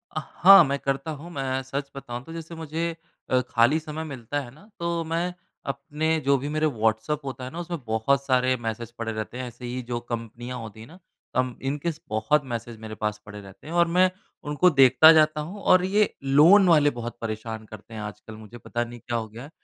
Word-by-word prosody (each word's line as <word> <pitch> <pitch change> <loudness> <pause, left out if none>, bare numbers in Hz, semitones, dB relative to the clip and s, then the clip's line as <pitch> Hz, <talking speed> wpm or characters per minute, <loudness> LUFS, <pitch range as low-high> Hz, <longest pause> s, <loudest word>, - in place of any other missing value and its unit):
अ, - - 0 0.2
हाँ, 195 0 +10
मैं 140 -2 -1
करता 135 +3 -2
हूँ 170 +4 -10
मैं 135 -3 -2
सच 140 +2 -4
बताऊँ 120 -2 -6
तो 165 - -10
जैसे 165 0 -8
मुझे 160 +1 -3 0.4
अ, 130 0 +3
खाली 120 +7 +3
समय 155 0 -6
मिलता 140 -2 -4
है 125 - -9
ना 195 - -19
तो 170 -1 -1
मैं 170 +2 -1 0.4
अपने 160 +2 -2
जो 140 0 +4
भी 140 +3 -4
मेरे 155 +1 0
व्हाट्सऐप 115 +2 0
होता 130 -1 -6
है 130 - -6
ना 170 - -7
उसमें 175 -1 -4
बहुत 125 +5 +1
सारे 130 -1 +2
मैसेज 115 +1 -4
पड़े 115 -1 -3
रहते 110 +3 -5
हैं। 130 -1 -4
ऐसे 120 +1 -10
ही 125 +1 -4
जो 120 - -1
कंपनियाँ 120 +1 -6
होती 110 -1 -9
है 110 - -10
ना? 170 +4 -14 0.4
कम्प 130 -1 0
इनके 145 +5 -2
स 160 - -13
बहुत 110 +8 +1
मैसेज 115 0 -5
मेरे 110 -1 -8
पास 105 0 -2
पड़े 105 0 -9
रहते 95 +7 -14
हैं 165 - -6
और 170 0 +4
मैं 180 +2 +4 0.3
उनको 150 +5 +3
देखता 140 +1 +7
जाता 155 -1 +3
हूँ। 190 +7 -8
और 185 0 +5
ये 205 +2 +2
लोन 165 +9 +6
वाले 150 -4 +5
बहुत 120 -1 -6
परेशान 110 0 -5
करते 110 +1 -12
हैं 110 - -6
आजकल 105 +1 -8
मुझे। 110 +2 -12
पता 120 +1 -3
नहीं 120 0 -9
क्या 120 0 -3
हो 110 -1 -4
गया 115 +3 -10
है? 145 - -10
135 Hz, 225 wpm, -25 LUFS, 115-160 Hz, 0.4 s, हाँ